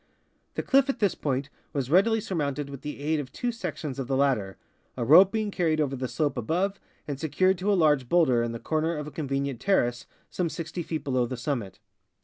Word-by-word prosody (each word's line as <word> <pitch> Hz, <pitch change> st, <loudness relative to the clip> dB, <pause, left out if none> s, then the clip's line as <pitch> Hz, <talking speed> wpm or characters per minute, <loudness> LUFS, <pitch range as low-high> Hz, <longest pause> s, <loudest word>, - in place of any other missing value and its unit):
The -, -, -2 dB
cliff 275 Hz, 0 st, +3 dB
at 275 Hz, -, 0 dB
this 205 Hz, -4 st, +2 dB
point 140 Hz, 0 st, -2 dB, 0.2 s
was 135 Hz, -2 st, -2 dB
readily 220 Hz, +6 st, +4 dB
surmounted 145 Hz, -8 st, -2 dB
with 140 Hz, -, -8 dB
the 150 Hz, -1 st, -6 dB
aid 155 Hz, +1 st, 0 dB
of 130 Hz, -3 st, -6 dB
two 245 Hz, -, -2 dB
sections 150 Hz, -, -5 dB
of 130 Hz, -, -3 dB
the 135 Hz, -1 st, 0 dB
ladder, 125 Hz, -9 st, +1 dB, 0.4 s
a 120 Hz, -, -1 dB
rope 180 Hz, +9 st, +8 dB
being 215 Hz, -2 st, -1 dB
carried 160 Hz, -4 st, +1 dB
over 140 Hz, -3 st, 0 dB
the 130 Hz, 0 st, -3 dB
slope 145 Hz, 0 st, -1 dB
above 180 Hz, -, -1 dB, 0.3 s
and 140 Hz, -2 st, -4 dB
secured 185 Hz, +4 st, +2 dB
to 200 Hz, +3 st, +1 dB
a -, -, +4 dB
large 150 Hz, -7 st, +3 dB
bowlder 150 Hz, -9 st, +4 dB
in 120 Hz, 0 st, -1 dB
the 115 Hz, -, -4 dB
corner 160 Hz, +5 st, -1 dB
of 150 Hz, -, -4 dB
a 150 Hz, -, -8 dB
conve 140 Hz, -2 st, -2 dB
nient 135 Hz, -4 st, -4 dB
terrace 120 Hz, -12 st, +1 dB, 0.2 s
some 175 Hz, -2 st, -1 dB
60 165 Hz, +1 st, -5 dB
feet 160 Hz, -1 st, -4 dB
below 130 Hz, -3 st, +1 dB
the 130 Hz, +1 st, -5 dB
summit. 115 Hz, -7 st, -3 dB
150 Hz, 220 wpm, -27 LUFS, 130-175 Hz, 0.4 s, rope